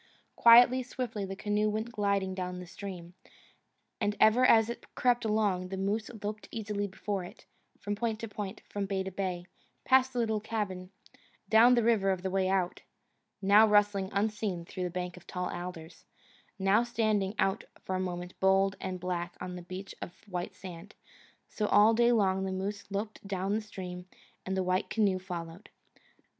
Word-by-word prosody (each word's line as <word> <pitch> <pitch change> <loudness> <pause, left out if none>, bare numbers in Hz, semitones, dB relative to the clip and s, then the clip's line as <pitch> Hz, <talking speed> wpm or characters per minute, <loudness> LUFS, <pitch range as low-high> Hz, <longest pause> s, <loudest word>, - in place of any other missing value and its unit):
Quietly, 245 +2 +7
swiftly, 240 -5 -4
the 195 0 -6
canoe 210 +1 0
went 220 +3 -3
gliding 200 -3 0
down 180 -1 -4
the 180 - -8
stream; 180 -1 -8 0.9
and 205 0 0
ever 220 +4 +5
as 225 -3 +6
it 235 - -8
crept 245 -2 +2
along, 205 -4 +1
the 190 - -4
moose 205 +3 -1
loped 210 +1 -4
easily 210 -2 -3
before 195 0 -4
it, 175 - -12 0.3
from 205 - -3
point 220 +1 -2
to 225 - -4
point, 205 -2 -6
from 200 -1 -3
bay 190 -1 -1
to 190 - -5
bay, 185 -2 -3 0.4
past 260 0 +4
the 250 - -7
little 220 -2 +1
cabin, 205 -4 -4 0.6
down 235 +3 +7
the 235 - +2
River 220 -4 +3
of 185 -1 -1
the 190 - -2
Way 190 0 +1
Out, 185 -2 0 0.6
now 205 +3 +7
rustling 205 -2 +3
unseen 200 -3 -1
through 180 0 -4
a - - -5
bank 180 0 -5
of - - -15
tall 180 -1 -3
alders, 175 -2 -7 0.5
now 195 +3 +3
standing 215 -4 0
out 195 0 0 0.2
for 190 - -4
a - - -1
moment 180 -1 -4
bold 195 +1 +3
and 185 -1 -4
black 175 -1 -3
on 180 0 -5
a 180 - -7
beach 185 +3 -8
of 175 - -9
white 180 -2 -4
sand 180 +1 -10 0.5
so 210 - -2
all 210 +2 +6
day 235 +1 +4
long 190 -4 +2
the 190 - -2
moose 200 +2 -4
loped 205 +2 -4
down 195 0 -1
the 220 - 0
stream 180 -4 -8 0.4
and 190 0 -1
the 190 - +1
white 185 +1 0
canoe 200 -4 +2
followed. 175 0 -7
195 Hz, 180 wpm, -30 LUFS, 185-215 Hz, 0.9 s, Quietly